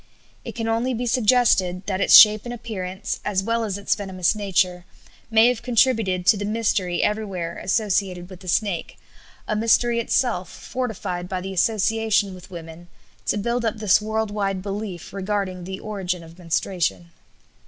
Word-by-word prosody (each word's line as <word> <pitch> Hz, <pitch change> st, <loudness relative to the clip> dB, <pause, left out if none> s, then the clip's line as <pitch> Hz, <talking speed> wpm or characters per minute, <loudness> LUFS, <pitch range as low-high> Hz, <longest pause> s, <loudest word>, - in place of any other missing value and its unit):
It -, -, -8 dB
can 225 Hz, -1 st, -3 dB
only 235 Hz, +3 st, 0 dB
be 245 Hz, +2 st, -3 dB
suggested 215 Hz, -6 st, +2 dB
that 190 Hz, -1 st, -2 dB
its -, -, +6 dB
shape 215 Hz, -1 st, +9 dB
and 240 Hz, -, -5 dB
appearance, 190 Hz, -5 st, -5 dB
as 195 Hz, -2 st, 0 dB
well 230 Hz, +2 st, 0 dB
as 200 Hz, -3 st, -3 dB
its 200 Hz, -, 0 dB
venomous 190 Hz, -4 st, 0 dB
nature, 185 Hz, -4 st, 0 dB, 0.5 s
may 225 Hz, +1 st, +5 dB
have 245 Hz, -2 st, -2 dB
contributed 225 Hz, -7 st, +2 dB
to 210 Hz, -, +5 dB
the 205 Hz, -, -4 dB
mystery 205 Hz, -4 st, 0 dB
everywhere 195 Hz, -6 st, -2 dB
associated 190 Hz, -3 st, -1 dB
with 185 Hz, -1 st, -12 dB
the 185 Hz, -, -13 dB
snake 185 Hz, -1 st, -1 dB, 0.5 s
a 215 Hz, -, -1 dB
mystery 235 Hz, +2 st, +2 dB
itself 230 Hz, -6 st, 0 dB
fortified 205 Hz, -8 st, -5 dB
by 185 Hz, -, -2 dB
the 190 Hz, +1 st, -6 dB
association 215 Hz, 0 st, +1 dB
with 185 Hz, 0 st, -12 dB
women 170 Hz, -1 st, -10 dB, 0.4 s
to -, -, +1 dB
build 235 Hz, +4 st, -1 dB
up 225 Hz, -1 st, -1 dB
this 210 Hz, -1 st, +3 dB
world 220 Hz, 0 st, -2 dB
wide 195 Hz, -2 st, -2 dB
belief 195 Hz, -3 st, -6 dB
regarding 195 Hz, -2 st, -3 dB
the 190 Hz, +1 st, -6 dB
origin 185 Hz, -4 st, -4 dB
of 165 Hz, +2 st, -15 dB
menstruation. 165 Hz, -, -2 dB
200 Hz, 165 wpm, -23 LUFS, 185-220 Hz, 0.5 s, shape